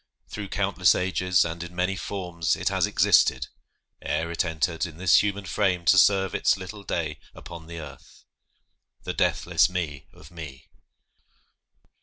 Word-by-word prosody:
Through 105 Hz, -1 st, -6 dB
countless 95 Hz, -3 st, +2 dB
ages 90 Hz, -1 st, +1 dB
and 85 Hz, 0 st, -5 dB
in 90 Hz, 0 st, -8 dB
many 90 Hz, +2 st, 0 dB
forms 90 Hz, -4 st, -2 dB
It -, -, -1 dB
has -, -, +1 dB
existed, 65 Hz, 0 st, +3 dB, 0.5 s
ere 85 Hz, +1 st, -2 dB
it 85 Hz, -, 0 dB
entered 80 Hz, +1 st, -1 dB
in 80 Hz, -2 st, -12 dB
This 95 Hz, +1 st, +5 dB
human 100 Hz, -1 st, -3 dB
frame 90 Hz, 0 st, 0 dB
to 95 Hz, -, +6 dB
serve 95 Hz, +2 st, +3 dB
its -, -, +2 dB
little 95 Hz, +2 st, -8 dB
day 80 Hz, -6 st, -3 dB, 0.2 s
Upon 85 Hz, -2 st, -11 dB
the 85 Hz, 0 st, -8 dB
earth. 75 Hz, -4 st, -12 dB, 0.8 s
The -, -, -4 dB
deathless -, -, +2 dB
Me 85 Hz, -6 st, -4 dB
of 75 Hz, +1 st, -16 dB
me. 75 Hz, -6 st, -10 dB
90 Hz, 150 wpm, -25 LUFS, 80-95 Hz, 0.8 s, to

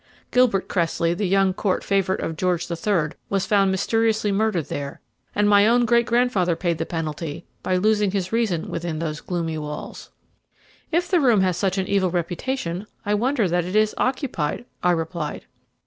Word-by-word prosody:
Gilbert 250 Hz, -6 st, +3 dB
Cressley, 170 Hz, -1 st, 0 dB
the 190 Hz, +3 st, -1 dB
young 195 Hz, 0 st, +3 dB
Court 190 Hz, 0 st, -1 dB
favourite 195 Hz, -1 st, +1 dB
of 160 Hz, -, -3 dB
George 175 Hz, 0 st, 0 dB
the 170 Hz, -, -4 dB
Third, 165 Hz, -4 st, 0 dB, 0.2 s
was 195 Hz, -1 st, 0 dB
found 200 Hz, -2 st, +3 dB
mysteriously 220 Hz, +2 st, +1 dB
murdered 200 Hz, -5 st, +1 dB
there, 140 Hz, -1 st, -5 dB, 0.4 s
and 205 Hz, 0 st, +3 dB
my 205 Hz, 0 st, +6 dB
own 240 Hz, +1 st, +4 dB
great 235 Hz, 0 st, +3 dB
grandfather 230 Hz, -8 st, +2 dB
paid 170 Hz, -2 st, -1 dB
the 165 Hz, -, -2 dB
penalty 160 Hz, 0 st, -4 dB, 0.2 s
by 185 Hz, -, 0 dB
losing 210 Hz, +2 st, +2 dB
his 185 Hz, -1 st, -2 dB
reason 220 Hz, -8 st, 0 dB
within 165 Hz, -1 st, -3 dB
those 155 Hz, -1 st, -3 dB
gloomy 165 Hz, -3 st, -3 dB
walls." 150 Hz, 0 st, -7 dB, 0.8 s
"If 345 Hz, +2 st, +1 dB
the 360 Hz, -2 st, +3 dB
room 235 Hz, -7 st, +4 dB
has 185 Hz, -2 st, +2 dB
such 190 Hz, +1 st, 0 dB
an 190 Hz, -, 0 dB
evil 190 Hz, -1 st, +1 dB
reputation, 175 Hz, +2 st, -3 dB, 0.2 s
I 205 Hz, -, +1 dB
wonder 235 Hz, 0 st, +1 dB
that 175 Hz, 0 st, +1 dB
it 180 Hz, +4 st, -5 dB
is 215 Hz, 0 st, +3 dB
occupied," 250 Hz, -, -1 dB, 0.2 s
I 180 Hz, -, +2 dB
replied. 165 Hz, -2 st, -2 dB
190 Hz, 180 wpm, -23 LUFS, 170-215 Hz, 0.8 s, my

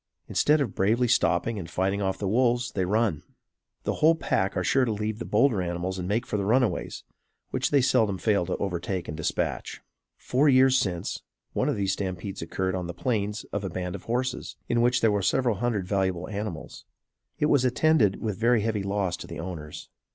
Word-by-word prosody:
Instead 150 Hz, +1 st, +3 dB
of 120 Hz, -8 st, -2 dB
bravely 115 Hz, +6 st, +2 dB
stopping 115 Hz, -2 st, +2 dB
and 85 Hz, -4 st, -7 dB
fighting 95 Hz, +3 st, 0 dB
off 95 Hz, -1 st, -1 dB
the 100 Hz, -, -3 dB
wolves, 120 Hz, +3 st, +2 dB
they 95 Hz, -2 st, -1 dB
run. 105 Hz, -5 st, +1 dB, 0.6 s
The -, -, -1 dB
whole 160 Hz, +2 st, +6 dB
pack 95 Hz, -11 st, -1 dB
are 90 Hz, -, 0 dB
sure 135 Hz, +8 st, +3 dB
to 120 Hz, -, 0 dB
leave 105 Hz, +1 st, -3 dB
the -, -, -4 dB
bolder 110 Hz, -2 st, +2 dB
animals 90 Hz, +1 st, -3 dB
and 90 Hz, -, -4 dB
make 105 Hz, +4 st, 0 dB
for 105 Hz, -, -2 dB
the 100 Hz, -, -1 dB
runaways, 120 Hz, +3 st, 0 dB, 0.5 s
which -, -, 0 dB
they 140 Hz, -, +4 dB
seldom 115 Hz, -7 st, +2 dB
fail 100 Hz, -4 st, +1 dB
to -, -, -2 dB
overtake 90 Hz, -1 st, -3 dB
and 75 Hz, -, -5 dB
dispatch. 80 Hz, -, -2 dB, 0.4 s
Four 140 Hz, +4 st, +2 dB
years 130 Hz, 0 st, +5 dB
since, 90 Hz, -9 st, -1 dB, 0.3 s
one -, -, +1 dB
of -, -, 0 dB
these 100 Hz, -1 st, 0 dB
stampedes 95 Hz, 0 st, -4 dB
occurred 95 Hz, +3 st, -2 dB
on 90 Hz, -2 st, -3 dB
the 85 Hz, -, -6 dB
Plains 105 Hz, 0 st, -1 dB
of 100 Hz, -, -2 dB
a 95 Hz, -, -2 dB
band 90 Hz, 0 st, -4 dB
of -, -, -8 dB
horses, 125 Hz, +2 st, -2 dB
in 120 Hz, 0 st, +2 dB
which 125 Hz, +1 st, +3 dB
there 110 Hz, -, +4 dB
were 100 Hz, -1 st, +1 dB
several 120 Hz, +3 st, +1 dB
hundred 110 Hz, -5 st, -1 dB
valuable 95 Hz, -3 st, 0 dB
animals. 100 Hz, -6 st, -6 dB, 0.5 s
It -, -, +1 dB
was 145 Hz, -3 st, +3 dB
attended 125 Hz, -5 st, +3 dB
with 105 Hz, -4 st, -3 dB
very 115 Hz, 0 st, +3 dB
heavy 110 Hz, -1 st, -1 dB
loss 100 Hz, -2 st, -1 dB
to -, -, -9 dB
the -, -, -7 dB
owners. 80 Hz, -4 st, -7 dB
105 Hz, 205 wpm, -26 LUFS, 95-120 Hz, 0.6 s, whole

